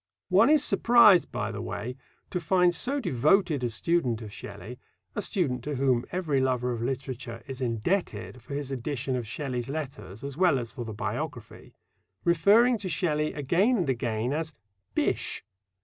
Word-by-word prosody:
One 200 +7 +5
is 305 -2 +5
surprised, 230 -10 +5
by 105 +2 -2
the 105 -2 -5
way, 105 +5 -5 0.4
to 180 - -2
find 180 +2 +3
so 270 +11 0
devoted 155 - +2
a 120 - +1
student 120 -2 0
of 105 -2 -9
Shelley 100 +5 -9 0.3
a 210 - -2
student 140 - -1
to 150 -1 -2
whom 130 -2 +2
every 160 -7 0
lover 125 -1 0
of 115 - -4
literature 125 -2 -4
is 135 0 -7
indebted 115 - -2
for 140 +5 -7
his 140 -1 -4
edition 135 0 -2
of 120 -3 -3
Shelley's 125 0 -4
letters 130 -8 -6
as 140 -1 -5
well 180 -5 +4
as 120 -2 -5
for 120 - -6
the 110 - -5
biography - - -5 0.5
referring 210 +8 +4
to 190 -2 -4
Shelley 155 -3 0
again 175 - +2
and 175 -8 0
again 120 0 -1
as 160 0 -3 0.4
"Bysshe." - - 0
135 Hz, 165 wpm, -27 LUFS, 120-175 Hz, 0.5 s, One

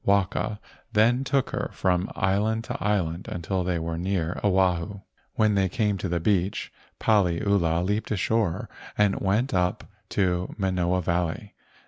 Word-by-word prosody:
Waka 100 +1 +1 0.3
then 120 +4 +4
took 135 0 0
her - - -2
from 90 +1 +1
island 110 +3 +1
to - - -5
island 95 -4 0
until 90 +2 -2
they 90 -1 0
were 80 0 -3
near 90 -2 -1
Oahu. 95 0 +1 0.3
When 110 -1 +3
they 95 -2 +2
came 105 -6 0
to 95 - -3
the 85 0 0
beach, 95 +1 0 0.3
Paliula 90 -4 +2
leaped 105 +3 -1
ashore 105 -2 0 0.3
and 105 -2 +3
went 105 +7 +1
up 90 -1 +1 0.3
to 90 -2 0
Manoa 90 -2 0
Valley. 85 +4 -1
95 Hz, 140 wpm, -26 LUFS, 90-105 Hz, 0.3 s, then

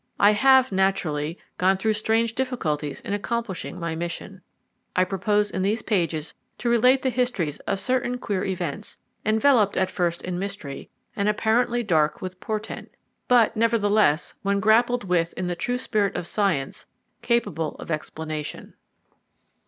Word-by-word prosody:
I 205 - +7
have, 260 +4 +5
naturally, 175 -5 0 0.2
gone 190 +1 +3
through 220 +3 +1
strange 225 +2 +1
difficulties 160 - -2
in 200 - -4
accomplishing 205 -4 -3
my 170 -1 -2
mission. 175 +3 -6 0.5
I 185 - +4
propose 205 +2 0
in 185 - -2
these 210 +4 0
pages 165 -6 -1 0.2
to 240 - 0
relate 250 +3 +4
the 260 - +1
histories 235 - -1
of 195 - 0
certain 250 +1 0
queer 205 -6 -2
events, 185 0 -4 0.3
enveloped 220 -1 +3
at 185 0 +1
first 170 -1 -1
in 180 -1 -3
mystery, 195 -8 -6 0.3
and 200 +1 +1
apparently 235 +3 +1
dark 155 -7 +2
with 185 0 -7
portent, 215 +2 -5 0.4
but, 240 -3 +4
nevertheless, 215 -7 +2
when 200 0 +1
grappled 235 +3 +3
with 175 -3 0
in 185 - -4
the 175 0 -2
true 245 +8 -1
spirit 210 -5 0
of - - -3
science, 170 -8 -1 0.3
capable 180 -10 0
of - - -8
explanation. 155 0 -5
200 Hz, 145 wpm, -24 LUFS, 175-230 Hz, 0.5 s, I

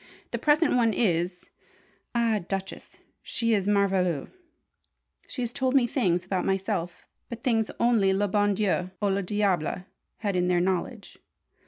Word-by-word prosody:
The - - -2
present 300 -1 +3
one 230 -3 +3
is 180 -4 0 0.7
ah, 230 -2 +2
Duchess, 195 0 -5 0.2
she 230 -1 -1
is 200 -2 +1
merveilleuse. 190 -7 +1 1.0
She 250 - -4
has 240 0 -4
told 260 +1 0
me 260 -3 +5
things 185 -8 0
about 185 -1 -1
myself 185 -3 -2 0.2
but 235 -1 -8
things 225 -5 +1
only 230 -5 +3
le 200 +2 +1
bon 205 +1 +2
Dieu 185 -3 0
ou 205 -2 +1
le 195 +1 +1
diable 185 -3 0 0.4
had 205 -3 -1
in 180 0 +1
their 180 -1 +2
knowledge! 190 +5 -2
200 Hz, 150 wpm, -27 LUFS, 185-230 Hz, 1.0 s, me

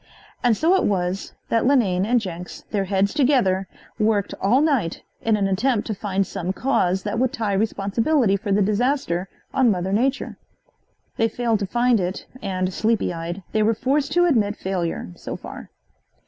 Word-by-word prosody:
And 240 -3 +3
so 330 +4 +3
it 380 - +3
was 185 -1 -1 0.2
that 230 +1 +2
Linane 200 -9 +2
and 245 +1 +3
Jenks, 180 -4 -7
their 200 -2 0
heads 195 +1 +1
together, 245 -10 +2 0.3
worked 210 -2 +1
all 215 +7 +4
night 275 - 0 0.2
in 220 -1 +2
an 200 -1 +1
attempt 210 +4 +1
to 220 - -2
find 195 -1 -1
some 185 -1 -3
cause 190 -7 +1
that 210 +2 -2
would 255 -1 +2
tie 225 -7 -2
responsibility 210 +4 +1
for 200 +1 -3
the 200 +1 +3
disaster 210 -4 0 0.2
on 260 -3 +4
mother 190 -1 0
nature. 260 +6 0 0.8
They 225 - +3
failed 230 -1 0
to 200 - -2
find 240 +2 +2
it 180 +1 -3 0.2
and, 185 -1 -2
sleepy 220 -2 +1
eyed, 170 +3 -5
they 215 - +1
were 220 +1 +3
forced 280 +5 0
to 350 0 +4
admit 220 -11 +2
failure, 175 - -3
so - - -6
far. - - -9
210 Hz, 175 wpm, -23 LUFS, 190-245 Hz, 0.8 s, all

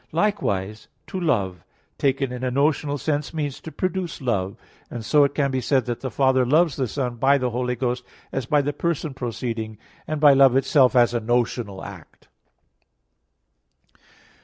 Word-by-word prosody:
Likewise 110 - -1 0.2
to 190 - -5
love, 95 - 0 0.4
taken 135 -1 +1
in 125 0 -6
a 130 - +1
notional 145 +2 +1
sense, 150 +2 -2
means 145 -4 -3
to 160 - -8
produce 185 -1 -3
love; 100 -8 -2 0.3
and 115 -3 -6
so 145 +6 +5
it 140 0 0
can 140 -2 +1
be 130 -1 -1
said 130 +1 +1
that 120 -2 -3
the 130 - -4
Father 130 +1 +2
loves 155 +3 +3
the 130 -3 -1
Son 125 0 -3
by 135 +4 +4
the 125 -2 -1
Holy 125 +1 -1
Ghost, 125 -1 -2 0.3
as 135 -3 -3
by 145 +1 +3
the 145 +1 -2
person 160 -1 -2
proceeding, 115 -3 -4 0.3
and 155 -1 -2
by 145 -1 +7
Love 135 -2 +5
itself 135 -1 +4
as 120 -1 +4
a 120 - +1
notional 115 -3 -1
act. - - -12
130 Hz, 170 wpm, -23 LUFS, 120-145 Hz, 0.4 s, by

